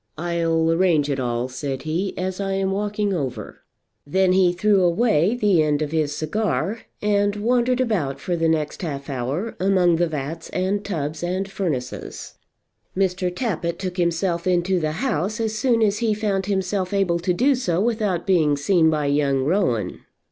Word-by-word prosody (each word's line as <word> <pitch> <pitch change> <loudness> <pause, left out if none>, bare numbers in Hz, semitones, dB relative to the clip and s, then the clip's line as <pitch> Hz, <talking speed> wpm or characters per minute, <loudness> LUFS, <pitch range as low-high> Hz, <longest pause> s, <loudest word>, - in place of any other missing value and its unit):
"I'll 165 -1 +1
arrange 165 -4 +2
it 135 - -1
all," 120 -1 -1
said 135 +1 -5
he, 170 +5 -2
"as 185 +1 -3
I'm 195 0 -1
walking 205 0 -1
over." 130 - -4 0.4
Then 185 +4 +2
he 185 -2 +4
threw 195 +2 +2
away 185 +2 +2
the 205 -8 +3
end 150 0 +1
of 150 - -4
his 155 -3 0
cigar, 200 +6 -1 0.2
and 205 -1 +2
wandered 245 +3 +1
about 195 - 0
for 175 - -2
the 165 -1 +1
next 155 +1 -1
half 140 -5 -4
hour 140 - -3
among 185 -3 +3
the 175 +1 +2
vats 155 0 -5
and 190 +3 -1
tubs 155 -5 -3
and 185 +2 -1
furnaces. 155 -11 -4 0.6
Mr. 185 -1 +1
Tappitt 175 -4 -2
took 185 -1 -5
himself 170 0 0
into 180 +1 +2
the 155 -2 -1
house 215 - -1
as 220 -1 -1
soon 230 0 +2
as 210 0 +1
he 225 -3 +1
found 200 -3 -1
himself 190 -1 -1
able 185 -4 +1
to 180 +2 0
do 255 +10 +3
so 180 -10 0
without 210 -5 0
being 155 -7 +3
seen 160 +2 +3
by 155 -2 0
young 140 -2 +1
Rowan. 155 - 0
180 Hz, 170 wpm, -22 LUFS, 155-200 Hz, 0.6 s, he